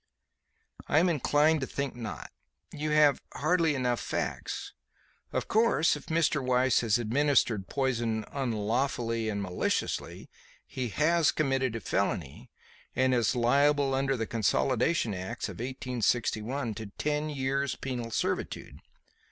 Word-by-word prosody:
"I - - +2
am 175 +3 +5
inclined 150 0 +2
to 130 - -2
think 140 -2 -3
not. 115 -3 -7 0.4
You 150 +1 -3
have 150 -2 +4
hardly 165 -1 +2
enough 125 -2 0
facts. - - -4 0.6
Of - - -2
course, 220 -7 +3
if - - -10
Mr. 160 -3 +1
Weiss 125 0 +3
has 115 -2 +2
administered 120 -4 +1
poison 120 -5 -1
'unlawfully 115 -2 -1
and 100 -1 -2
maliciously' 90 -2 -2 0.4
he 125 -2 -4
has 160 +6 +3
committed 135 -5 0
a - - -2
felony, 90 -9 -2 0.5
and 130 0 +3
is 120 0 +2
liable 140 +3 +3
under 135 0 +1
the 115 - -1
Consolidation 115 - +1
Acts 95 0 -4
of - - -9
1861 120 -1 -1
to 110 +1 -7
ten 150 0 -1
years' 140 -1 -1
penal 125 -3 -4
servitude. 110 - -3
130 Hz, 125 wpm, -29 LUFS, 115-145 Hz, 0.6 s, am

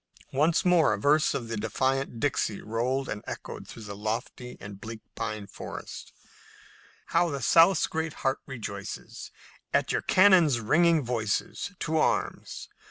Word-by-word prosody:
Once 155 +7 +2
more 175 -10 +5
a - - -8
verse 150 +7 +3
of 120 - -3
the 115 - -3
defiant 130 +3 -1
Dixie 115 -6 0
rolled 125 +5 -1
and 105 -1 -5
echoed - - -7
through 115 - -10
the 100 -1 -7
lofty 115 +4 -4
and 100 0 -10
bleak 110 0 -7
pine 110 -2 -4
forest: - - -8 1.0
"How 175 - +4
the 140 -2 -3
South's 165 +9 +5
great 160 0 -3
heart 135 0 +2
rejoices 105 -7 -7 0.4
At - - +1
your - - 0
cannon's 180 -9 +5
ringing 160 +7 +3
voices; 115 - -2
To 160 0 0
arms! - - -1
130 Hz, 145 wpm, -28 LUFS, 110-160 Hz, 1.0 s, more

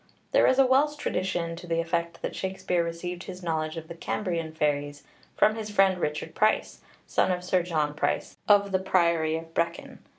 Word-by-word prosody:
There - - +5
is 260 - +3
a 270 - +6
Welsh 280 +4 +3
tradition 180 - -2
to 175 - -10
the 165 -1 0
effect 170 0 -2
that - - -3
Shakspeare 185 -2 -1
received 175 +2 -5
his 185 -1 -8
knowledge 160 -1 -2
of 160 -1 -7
the 170 - -7
Cambrian 170 -1 -3
fairies 145 -2 -1 0.3
from 215 - +5
his 215 -1 -5
friend 195 -3 +3
Richard 150 0 -2
Price, 215 +1 +1 0.2
son - - +1
of 180 -1 -2
Sir 180 0 +2
John 155 -4 -1
Price, 150 - -1
of 200 -1 +5
the 190 - +2
priory 170 -4 +2
of 165 0 -10
Brecon. 170 +1 -2
170 Hz, 190 wpm, -27 LUFS, 165-190 Hz, 0.3 s, a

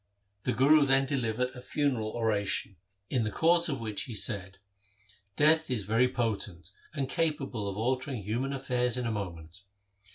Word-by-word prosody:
The - - +1
Guru 145 +6 +5
then 135 0 +4
delivered 125 -3 -1
a 125 -1 -11
funeral 125 -5 -1
oration, 105 -3 -1 0.4
in 125 -3 +1
the 105 - -1
course 170 +7 +3
of 135 -4 -2
which 110 -1 -3
he 120 -5 -6
said, 95 -3 -2 0.4
' 100 0 -30
Death 160 +1 +4
is 115 -6 -1
very 115 +5 +3
potent 105 -7 -2 0.2
and 140 -3 -1
capable 135 - -1
of 100 - -6
altering 130 0 -1
human 120 +7 -2
affairs 125 -3 0
in 125 - -2
a 115 - 0
moment. 90 -4 -6
120 Hz, 165 wpm, -30 LUFS, 105-135 Hz, 0.4 s, Guru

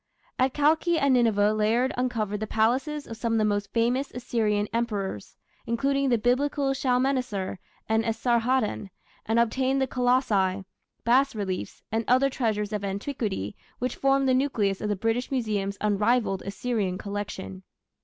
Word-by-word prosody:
At 260 0 +2
Kalkhi 320 +3 +3
and 280 -3 +3
Nineveh 215 -4 +3
Layard 225 +4 +1
uncovered 225 -5 -1
the 215 - -3
palaces 260 +8 0
of 225 - -8
some 230 0 -1
of - - +2
the 215 - +2
most 205 -1 -1
famous 245 +4 +1
Assyrian 220 -4 -1
Emperors, 205 - -3 0.3
including 275 +4 +1
the 240 - +3
Biblical 270 +4 +1
Shalmaneser 250 -7 0 0.3
and 220 0 +2
Esarhaddon, 230 -1 0 0.4
and 225 +1 +1
obtained 260 +3 +2
the 265 - +2
colossi, 230 -7 +1 0.4
bas 260 +2 +3
reliefs, 190 -3 -4
and 225 +1 0
other 265 +2 +4
treasures 215 -4 -1
of 210 -1 -2
antiquity 200 - -3 0.2
which 250 0 -2
formed 275 0 +2
the 260 - +4
nucleus 230 -8 +1
of 210 - -2
the 205 - +1
British 225 +5 -1
Museum's 210 -6 -1
unrivalled 210 0 +1
Assyrian 200 -2 -2
collection. 200 -2 -5
230 Hz, 145 wpm, -26 LUFS, 205-255 Hz, 0.4 s, other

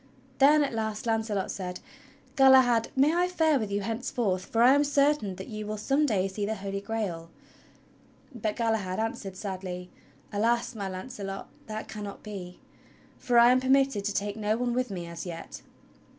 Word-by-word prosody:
Then 295 +2 +6
at 275 - -2
last 220 -1 -3
Launce 225 -1 0
ot 200 -3 -1
said: 180 -2 -5 0.6
"Galahad, 260 -4 +6
may 280 +4 +4
I 355 +1 +3
fare 320 -5 +2
with 215 -3 -3
you 200 +1 0
henceforth, 220 -3 -2
for 230 +1 +2
I 255 +2 +7
am 285 +1 +4
certain 280 -8 +2
that 190 - -8
you 215 -1 -6
will 215 0 -3
some 275 +8 +1
day 195 -6 +1
see 195 +2 -5
the 215 +2 -1
Holy 195 0 -4
Grail.?" 200 -7 -4 1.0
But 215 -3 -2
Galahad 220 -6 -1
answered 210 -4 -3
sadly: 185 -2 -6 0.4
"Alas! 235 +4 +1
my 200 -4 -4
Launcelot, 195 0 -6 0.2
that 215 0 -5
cannot 205 -2 -7
be, 190 -4 -8 0.6
for 245 -2 +1
I 235 +1 +8
am 255 - +4
permitted 265 -4 +2
to 205 - 0
take 205 0 -1
no 215 0 0
one 245 0 -1
with 250 0 0
me 180 -3 -5
as 170 +2 -7
yet." 165 -1 -8
220 Hz, 180 wpm, -28 LUFS, 195-250 Hz, 1.0 s, I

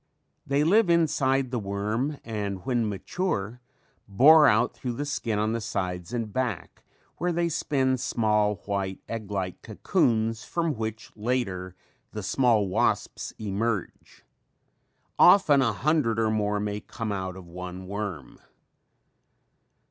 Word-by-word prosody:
They 140 +1 +2
live 200 +4 +4
inside 135 -6 +2
the 125 - -1
worm 105 +8 -2
and 100 -4 -4
when 120 -4 0
mature 110 - -3 0.5
bore 145 +10 +7
out 110 +3 +3
through 125 -2 -4
the 145 +5 -3
skin 115 -6 -2
on 110 +1 0
the 115 - -2
sides 90 -2 -3
and 115 -4 -3
back 125 -8 -3 0.4
where 180 +1 0
they 170 0 0
spin 135 -5 0
small 105 -3 +1
white 100 -2 -2
egg 110 -3 -5
like 95 -3 -3
cocoons 115 -1 0
from 165 -2 -1
which 110 -2 -5
later 105 -6 -2 0.4
the 105 - -5
small 110 -1 +2
wasps 95 - -1
emerge. 105 0 -4 0.9
Often 165 -7 +6
a 120 -4 +2
hundred 130 -1 +1
or 110 -1 +2
more 105 -1 0
may 105 0 -2
come 110 +1 -5
out 95 -2 -3
of 95 -2 -10
one 90 +1 -8
worm. 95 - -6
110 Hz, 135 wpm, -26 LUFS, 100-130 Hz, 0.9 s, bore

